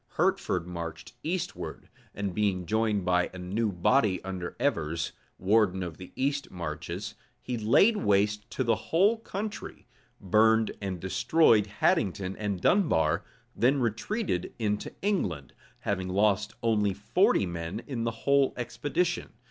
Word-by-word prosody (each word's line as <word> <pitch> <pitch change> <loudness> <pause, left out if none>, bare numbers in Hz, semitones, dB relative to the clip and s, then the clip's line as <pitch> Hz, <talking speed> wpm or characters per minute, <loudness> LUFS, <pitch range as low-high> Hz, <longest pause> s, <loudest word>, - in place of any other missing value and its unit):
Hertford 90 -2 +1
marched 85 -2 -7
eastward; 175 +3 -4 0.3
and 100 -2 -3
being 95 -3 0
joined 110 -1 +1
by 90 -1 +2
a 95 - -10
new 100 +5 -1
body 95 +1 +2
under 95 -2 -5
Evers, 85 - 0 0.3
warden 95 -1 +2
of 85 -3 -6
the 90 - -10
east 140 +1 -1
marches, 90 +4 -5 0.3
he 125 - -4
laid 120 - +4
waste 105 - +1
the 120 -3 +2
whole 200 +7 +2
country, 215 0 -6 0.3
burned 110 +3 +3
and 95 -3 -3
destroyed 105 - +3
Haddington 95 -2 0
and 105 -3 -2
Dunbar, 85 - +2 0.3
then 135 +4 +3
retreated 115 - -2
into 105 -2 -1
England; 95 - -1 0.3
having 95 -2 -2
lost 105 +2 +1
only 105 -4 +2
forty 105 -1 +2
men 85 +5 -5
in 125 -5 -3
the 115 -1 -4
whole 140 -1 +3
expedition. 160 +8 -2
105 Hz, 130 wpm, -28 LUFS, 90-120 Hz, 0.3 s, laid